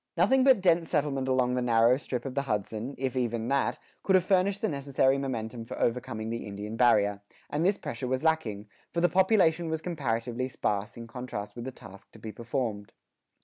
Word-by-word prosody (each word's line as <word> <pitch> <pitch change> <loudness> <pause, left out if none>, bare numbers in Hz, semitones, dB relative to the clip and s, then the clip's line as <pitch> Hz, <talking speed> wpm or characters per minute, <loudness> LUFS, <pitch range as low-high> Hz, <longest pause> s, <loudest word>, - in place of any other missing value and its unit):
Nothing 255 +10 +4
but 260 -6 +5
dense 170 -2 +3
settlement 140 -4 0
along 130 -1 +2
the 125 - 0
narrow 120 0 +4
strip 125 -4 -4
of 135 - -4
the 140 - 0
Hudson, 110 +5 -2
if 130 -1 -2
even 120 -2 -1
that, 140 0 +1 0.2
could 190 - +3
have 185 - +5
furnished 195 +2 +2
the - - +3
necessary 140 -3 +1
momentum 120 -3 -4
for 115 - -7
overcoming 115 -2 -1
the 115 -1 -4
Indian 105 +2 -6
barrier; 105 -4 +3 0.3
and 150 +3 0
this 195 +3 +3
pressure 135 -3 -5
was 130 +3 -1
lacking, 115 -11 0 0.2
for 170 - -2
the 175 - +4
population 175 -3 +3
was 160 0 -1
comparatively 130 -6 -2
sparse 105 -4 -2
in 115 - -7
contrast 115 -3 -6
with 120 0 -6
the 130 - -4
task 100 -6 -14
to - - -13
be 110 0 -7
performed. 115 -2 -4
130 Hz, 195 wpm, -28 LUFS, 115-160 Hz, 0.3 s, but